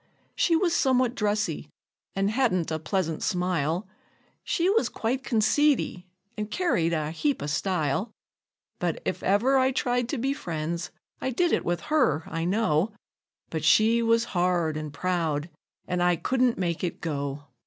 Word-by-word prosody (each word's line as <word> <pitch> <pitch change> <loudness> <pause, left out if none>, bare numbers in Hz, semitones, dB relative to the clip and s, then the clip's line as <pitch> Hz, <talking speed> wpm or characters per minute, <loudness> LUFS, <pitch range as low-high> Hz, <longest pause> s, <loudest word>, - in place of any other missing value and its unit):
She 335 - +3
was 340 0 +2
somewhat 255 -4 +2
dressy, 210 -2 -1 0.5
an' 195 +1 +1
hadn't 215 -9 +1
a 160 - -1
pleasant 165 0 -2
smile 180 -1 0 0.6
She 345 0 0
was 435 +4 +2
quite 255 +4 -2
conceity, 230 -4 +2 0.3
and 210 0 -4
carried 210 - +1
a 155 -2 -1
heap 280 - -1
o' - - -2
style; 160 - 0 0.7
But - - -1
if - - -2
ever 245 +8 +3
I 260 0 +3
tried 245 -1 0
to 285 - -1
be 270 +3 0
friends, 165 - -4 0.3
I - - -1
did 340 +7 +1
with 175 0 -1
her, 250 - +2
I 165 0 -3
know; 195 -1 +1 0.6
But 160 -2 -3
she 220 +9 +5
was 230 0 +3
hard 175 -3 +1
and 155 -1 -4
proud, 165 -1 -1 0.4
an' 180 0 -1
I 175 0 +4
couldn't 255 +5 +1
make 175 -2 -2
it 175 - -2
go. 145 -3 -3
190 Hz, 155 wpm, -26 LUFS, 165-245 Hz, 0.7 s, she